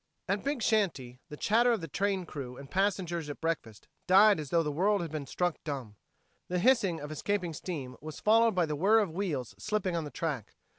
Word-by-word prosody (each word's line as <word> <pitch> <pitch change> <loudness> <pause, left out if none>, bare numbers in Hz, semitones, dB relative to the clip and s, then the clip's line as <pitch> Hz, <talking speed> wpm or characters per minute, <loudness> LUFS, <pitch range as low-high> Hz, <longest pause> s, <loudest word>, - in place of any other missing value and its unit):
At 200 +1 -1
Big 280 -4 -1
Shanty, 150 - 0
the 150 - -8
chatter 235 +7 +3
of 230 - +1
the 165 - -6
train 195 0 -1
crew 130 -6 -7
and 140 -1 -11
passengers 180 -5 0
at 145 - -6
breakfast 140 -11 -3 0.2
died 200 +1 +6
as 150 -3 -5
though 170 -1 +3
the 150 - -2
world 195 +5 +2
had 165 - -6
been 150 -3 -4
struck 175 +3 -1
dumb. 135 -8 -5 0.5
The 180 - -1
hissing 195 -5 +3
of 145 +1 -7
escaping 180 +2 -2
steam 145 -6 -5
was 155 +1 -8
followed 225 0 +4
by 180 -2 +3
the 150 -1 -3
whir 200 +9 +4
of 205 -6 +2
wheels 160 - -3
slipping 210 -4 -1
on 165 - -1
the 150 - -6
track. 145 -9 -4
175 Hz, 210 wpm, -30 LUFS, 150-200 Hz, 0.5 s, died